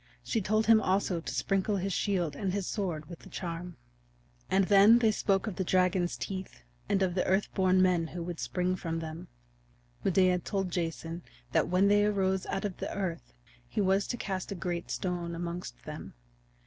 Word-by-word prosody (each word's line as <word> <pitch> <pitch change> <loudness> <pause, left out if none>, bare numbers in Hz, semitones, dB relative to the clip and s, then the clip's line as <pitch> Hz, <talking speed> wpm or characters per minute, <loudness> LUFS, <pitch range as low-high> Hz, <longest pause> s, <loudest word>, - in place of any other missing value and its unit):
She 225 - 0
told 215 +3 +1
him 225 -1 +6
also 185 -3 +1
to - - -5
sprinkle 195 +1 0
his 195 0 -1
shield 175 -8 0
and 185 +4 -2
his 200 -2 -1
sword 175 -8 -2
with 170 -2 -9
the - - -14
charm. 175 0 -5 0.7
And 195 0 +3
then 205 +3 +7
they 225 -2 +4
spoke 195 -1 +1
of 215 -5 -4
the 190 - 0
dragon's 180 -1 +2
teeth 185 - -6 0.3
and 195 -1 +3
of 180 -2 +1
the 180 - +1
Earth 190 +2 +1
born 185 -1 +4
Men 175 -3 +2
who 175 +1 -6
would 170 -1 -5
spring 180 0 0
from 165 -2 -3
them. 160 0 -6 0.8
Medea 185 -1 +3
told 195 0 -2
Jason 165 0 -3 0.3
that - - +2
when 185 +3 +3
they 205 0 +5
arose 190 -2 +1
out 195 +1 -2
of 195 -3 -4
the - - -4
earth 175 - -4 0.4
he - - -3
was 195 0 +2
to 240 - -3
cast 190 -3 -4
a - - -2
great 175 -1 -3
stone 175 -2 -2
amongst 170 - -5
them. - - -8
185 Hz, 190 wpm, -30 LUFS, 175-195 Hz, 0.8 s, then